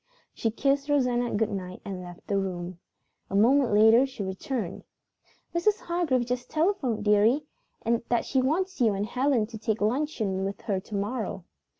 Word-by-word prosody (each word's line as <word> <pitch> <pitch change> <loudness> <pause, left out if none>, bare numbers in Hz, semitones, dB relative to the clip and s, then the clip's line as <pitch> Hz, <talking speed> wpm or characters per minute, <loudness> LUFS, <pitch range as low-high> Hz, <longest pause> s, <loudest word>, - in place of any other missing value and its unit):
She 225 - -1
kissed 275 +5 0
Rosanna 250 -4 +1
good 220 +1 +1
night 185 -2 -5
and 190 -2 -5
left 175 -1 -11
the 200 -1 0
room. 180 -2 -4 0.5
A 195 - -3
moment 250 +4 +4
later 220 +5 +6
she 260 -6 -6
returned. 190 +1 -4 0.7
"Mrs. 410 +6 +2
Hargrave 330 -8 0
just 245 0 -3
telephoned, 275 - 0
dearie, 210 +8 +4 0.7
that 240 -1 +1
she 265 - +1
wants 350 +5 -1
you 220 -4 +4
and 200 +1 -1
Helen 250 0 +1
to 220 0 -9
take 220 0 -1
luncheon 220 -5 0
with 195 +1 -4
her 195 -3 -1
to 205 +2 -8
morrow." 205 -3 -3
225 Hz, 165 wpm, -27 LUFS, 200-270 Hz, 0.7 s, later